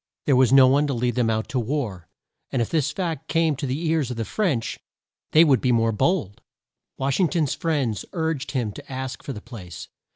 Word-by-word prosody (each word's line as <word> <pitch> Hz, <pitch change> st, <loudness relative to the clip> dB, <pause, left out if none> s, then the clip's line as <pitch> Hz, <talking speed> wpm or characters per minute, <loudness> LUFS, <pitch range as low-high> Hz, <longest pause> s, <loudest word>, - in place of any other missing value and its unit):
There 140 Hz, -, +4 dB
was 130 Hz, -1 st, +4 dB
no 135 Hz, -1 st, +8 dB
one 140 Hz, +3 st, +3 dB
to 140 Hz, -, -1 dB
lead 120 Hz, +1 st, 0 dB
them 120 Hz, -1 st, +1 dB
out 110 Hz, 0 st, -1 dB
to 130 Hz, -, -1 dB
war, 115 Hz, -, -3 dB, 0.4 s
and 130 Hz, -, -1 dB
if 115 Hz, -, -1 dB
this 155 Hz, -3 st, +1 dB
fact 165 Hz, -5 st, -3 dB
came 165 Hz, -2 st, +2 dB
to 140 Hz, -, -3 dB
the 140 Hz, +7 st, -2 dB
ears 155 Hz, -5 st, +1 dB
of 125 Hz, -, -5 dB
the 115 Hz, -, -2 dB
French, 155 Hz, -, -1 dB, 0.5 s
they 155 Hz, -, +7 dB
would 135 Hz, -7 st, +4 dB
be 125 Hz, -, +2 dB
more 115 Hz, -1 st, +3 dB
bold. 120 Hz, -, 0 dB, 0.6 s
Wash 135 Hz, 0 st, 0 dB
ing 185 Hz, -, +4 dB
ton's 160 Hz, -6 st, 0 dB
friends 140 Hz, -, -1 dB
urged 160 Hz, -6 st, -2 dB
him 120 Hz, -6 st, -1 dB
to 100 Hz, -, -11 dB
ask 130 Hz, 0 st, -5 dB
for -, -, -6 dB
the 105 Hz, -, -7 dB
place. 95 Hz, -9 st, -10 dB
130 Hz, 220 wpm, -24 LUFS, 115-155 Hz, 0.6 s, no